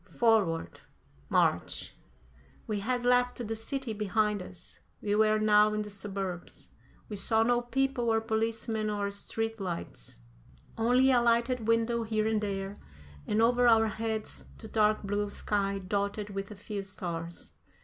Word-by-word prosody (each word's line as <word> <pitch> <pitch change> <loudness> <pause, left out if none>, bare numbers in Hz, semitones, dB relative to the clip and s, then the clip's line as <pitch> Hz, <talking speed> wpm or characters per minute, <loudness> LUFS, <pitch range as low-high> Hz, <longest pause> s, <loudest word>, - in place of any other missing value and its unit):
Forward! 215 -9 +2 0.5
March! - - +1 0.7
We 215 -3 -2
had 245 +4 -1
left 245 0 +3
the 225 - -2
city 245 +2 -4
behind 210 0 0
us; 180 0 -12 0.2
we 205 - -1
were 215 0 +4
now 210 0 +4
in 215 - -1
the 210 - -8
suburbs. 195 -3 -6 0.4
We 210 - -5
saw 220 +3 +2
no 240 +1 +2
people 255 0 0
or 225 0 +3
policemen 225 0 -1
or 205 -1 -1
street 225 +2 -3
lights, 170 - -6 0.6
only 250 +4 +4
a 245 -2 +4
lighted 235 0 +1
window 230 +1 +2
here 220 -1 0
and 220 -1 +1
there, 195 -1 -3 0.5
and 215 +2 +2
over 245 +1 +4
our 225 -1 +5
heads 220 0 -3
the 220 - -10
dark 215 -1 +2
blue 205 +1 -1
sky 200 -1 -1
dotted 200 +2 -2
with 195 0 -4
a 210 - -8
few 205 0 -5
stars. 170 -3 -6
215 Hz, 150 wpm, -30 LUFS, 200-230 Hz, 0.7 s, our